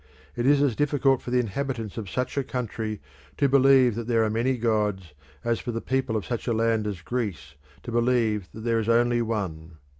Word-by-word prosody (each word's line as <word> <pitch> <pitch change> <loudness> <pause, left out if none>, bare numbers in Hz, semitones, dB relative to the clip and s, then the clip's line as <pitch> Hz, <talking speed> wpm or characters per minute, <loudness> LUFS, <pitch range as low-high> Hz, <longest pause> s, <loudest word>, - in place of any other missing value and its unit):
It 120 +1 0
is 145 0 +5
as 130 -6 +1
difficult 140 -2 +2
for - - -7
the 125 0 +2
inhabitants 120 -1 -3
of 105 -5 -5
such 125 +6 -2
a 140 - 0
country 110 -4 -4 0.4
to 140 - +3
believe 135 -2 +5
that 115 +1 -5
there 115 -2 +3
are 110 - 0
many 120 +4 0
gods 105 -7 -1 0.3
as 115 -1 0
for 120 - -4
the 115 - -3
people 130 -2 -1
of 105 - -4
such 120 0 -4
a 120 - +2
land 110 -1 +1
as 95 -4 -5
Greece 95 - -4 0.3
to - - -6
believe 115 -4 +1
that 110 - -9
there 115 0 +1
is 110 0 -2
only 120 +1 +3
one. 90 -8 -4
115 Hz, 210 wpm, -26 LUFS, 110-125 Hz, 0.4 s, is